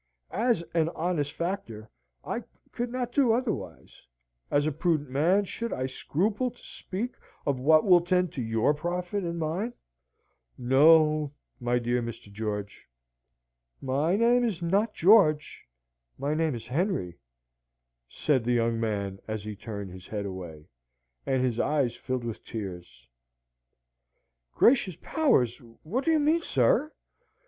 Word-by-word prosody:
As 230 -6 +1
an 165 -1 +2
honest 160 -4 -1
factor, 160 - -4 0.4
I - - -3 0.3
could 240 0 -3
not 250 -1 -3
do 250 -4 +3
otherwise; 240 -2 -4 0.5
as 145 0 +2
a 155 - +1
prudent 155 -2 0
man, 175 +9 +3
should 235 +4 -5
I 130 - -2
scruple 205 - -1
to 245 - -19
speak 215 +7 -5 0.3
of 140 -3 0
what 155 +4 +5
will 180 -3 +6
tend 180 0 +1
to 130 - -3
your 115 +4 +2
profit 180 +5 -3
and 170 -1 -3
mine? 170 +9 -2 0.8
No, 150 +3 +4 0.3
my 120 -1 +1
dear 120 0 0
Mr. 115 -3 -7
George." 105 -1 -5 0.9
"My 140 +7 +1
name 240 +3 +4
is 215 -8 -1
not 195 +6 0
George; 160 - +4 0.5
my 140 +2 -1
name 160 -3 0
is 115 -1 -7
Henry," 135 - -2 0.9
said 130 - +1
the 120 +1 +1
young 115 -1 +1
man 100 -3 -2
as 110 -2 -4
he 105 0 -6
turned 100 -3 -7
his 95 0 -11
head 105 -2 -4
away, 85 -6 -7 0.6
and 130 -1 +1
his 120 -3 0
eyes 140 -5 +1
filled 130 -2 -3
with 115 -2 -6
tears. 90 - -8 1.5
"Gracious 230 - +4
powers! 245 - +2 0.2
what 240 - -2
do - - +2
you 320 - +4
mean, 310 +3 +3
sir? 330 -3 +2
150 Hz, 140 wpm, -28 LUFS, 115-195 Hz, 1.5 s, will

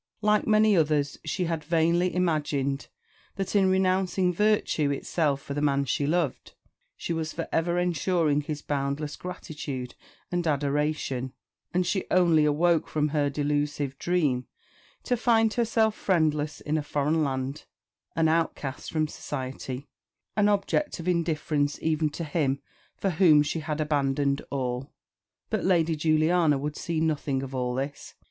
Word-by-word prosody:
Like 210 0 +3
many 215 -1 +5
others, 150 -4 +1
she 180 - -1
had 165 -2 -2
vainly 170 +3 +2
imagined 145 -5 0 0.5
that, 195 +1 -3
in 195 -2 +4
renouncing 185 -1 +2
virtue 210 -7 +2
itself 140 0 0
for 140 - -5
the 145 - -2
man 140 -1 +2
she 140 +2 0
loved, 165 -3 -1 0.4
she - - -3
was 160 -1 -3
for 165 - -4
ever 170 +2 +1
ensuring 170 -3 +1
his 150 0 -5
boundless 145 +1 -2
gratitude 150 -8 -6 0.4
and 175 -1 -1
adoration; 145 -3 -1 0.4
and 180 0 +1
she 190 +2 -1
only 170 -4 +4
awoke 165 +3 +2
from 150 -1 0
her 145 -1 +1
delusive 145 -1 -1
dream 150 -8 0 0.6
to 250 - +1
find 225 -2 +3
herself 225 -2 +2
friendless 155 -6 0
in 155 +1 0
a - - -2
foreign 150 +2 0
land, 135 +1 -3 0.5
an 165 0 +3
outcast 155 -4 -1
from 155 -1 +1
society, 130 -2 -6 0.5
an 210 -1 +3
object 205 +8 0
of 170 - -6
indifference 155 -4 0
even 155 -1 +1
to 160 +3 -5
him 145 -3 0 0.4
for 195 - 0
whom 160 -4 +5
she 150 +3 -2
had 155 -1 -3
abandoned 140 -2 +1
all. 130 -1 -3 0.6
But - - 0
Lady 170 -3 +2
Juliana 155 0 +3
would 145 +2 -4
see 165 -2 -2
nothing 150 -4 0
of 135 0 -7
all 125 -1 -1
this. 140 +2 -5
155 Hz, 145 wpm, -27 LUFS, 145-175 Hz, 0.6 s, many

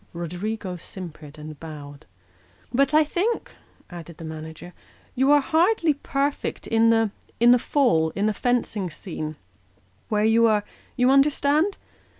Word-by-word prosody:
Roderigo 180 +3 -4
simpered 160 -4 -10
and 150 -1 -9
bowed. 145 - -10 0.3
" 90 - -32
But 275 +3 +3
I 310 +1 +5
think," 370 +10 -2 0.4
added 170 -1 -9
the - - -10
manager, 160 +2 -8 0.2
" - - -32
you 265 +2 +2
are 290 0 +6
hardly 330 +2 +2
perfect 280 0 -2
in 225 0 +3
the 225 -2 +3 0.5
fall 230 - +2
in 200 - 0
the 215 - +1
fencing 230 -5 -1
scene, 155 -2 -6 0.7
where 210 -1 +1
you 230 +1 +5
are 210 -2 +2 0.3
you 250 +1 +4
understand 295 +6 +3
215 Hz, 140 wpm, -24 LUFS, -, 0.7 s, are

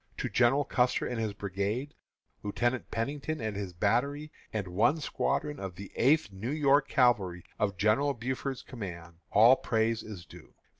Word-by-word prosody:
To - - -2
General 130 +4 +3
Custer 125 0 +1
and 120 -2 -3
his 110 -2 -1
brigade, 100 +8 -3 0.5
Lieutenant 120 +4 -1
Pennington 145 +6 -3
and 110 -2 -3
his 100 -2 -4
battery, 130 - 0 0.2
and 105 -3 -3
one 115 - +2
squadron 150 0 -1
of 95 -2 -6
the 100 +1 -9
Eighth 140 -2 +3
New 95 +5 -5
York 145 -1 +3
Cavalry, 105 - +2 0.2
of 100 -3 0
General 115 +9 +2
Buford's 130 +2 -3
command, 85 -8 -8
all 115 +5 +7
praise 115 -2 0
is 100 -6 -9
due. - - -15
115 Hz, 155 wpm, -30 LUFS, 100-135 Hz, 0.5 s, all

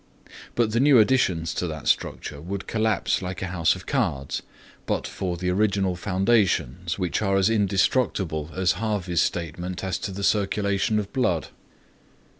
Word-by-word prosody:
But 115 -2 +2
the 115 - +1
new 140 0 +6
additions 95 -9 +3
to 90 - -2
that 80 -2 -6
structure 70 -1 -1
would 95 +4 -5
collapse 110 -3 0
like 95 0 -5
a 95 -1 -4
house 85 -2 +2
of 90 - -10
cards 85 - -1 0.5
but - - -1
for 90 -2 -3
the 90 +1 -1
original 100 -1 +1
foundations 90 - +1
which 90 0 -1
are 95 -2 +2
as 95 +3 +3
indestructible 100 - +1
as 95 -1 +2
Harvey's 95 -4 -1
statement 90 +2 -3
as 95 -1 -2
to 100 - -4
the 100 +1 -5
circulation 100 +1 +1
of 105 - 0
the 100 - -24
blood. 90 -11 0
95 Hz, 160 wpm, -25 LUFS, 90-105 Hz, 0.5 s, new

